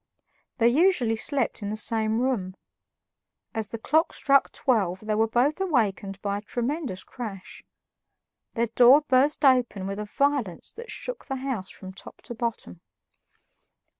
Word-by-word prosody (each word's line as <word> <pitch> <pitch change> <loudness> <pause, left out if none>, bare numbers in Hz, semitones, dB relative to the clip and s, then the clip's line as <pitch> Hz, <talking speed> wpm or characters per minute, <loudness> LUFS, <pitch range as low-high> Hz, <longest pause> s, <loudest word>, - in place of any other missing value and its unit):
They 230 -2 +4
usually 260 -4 +3
slept 250 +1 -1
in 205 - -4
the 215 - -3
same 220 0 +1
room. 205 -8 -1 1.0
As 220 -2 -2
the 230 - -5
clock 315 +8 +1
struck 275 -1 +3
twelve 195 -8 0
they 215 0 -2
were 220 +1 +2
both 265 - +1
awakened 205 - 0
by 200 0 -1
a - - -11
tremendous 240 - -3
crash. 210 -7 -8 0.9
Their 235 0 +2
door 245 +5 +6
burst 285 +1 +2
open 245 -7 +3
with 195 +1 -4
a 210 - -4
violence 260 - -1
that 465 0 -10
shook - - -6
the 270 - -3
house 255 -8 -4
from 190 -1 -10
top 195 - -12
to - - -7
bottom. 225 - -5
235 Hz, 150 wpm, -26 LUFS, 205-275 Hz, 1.0 s, door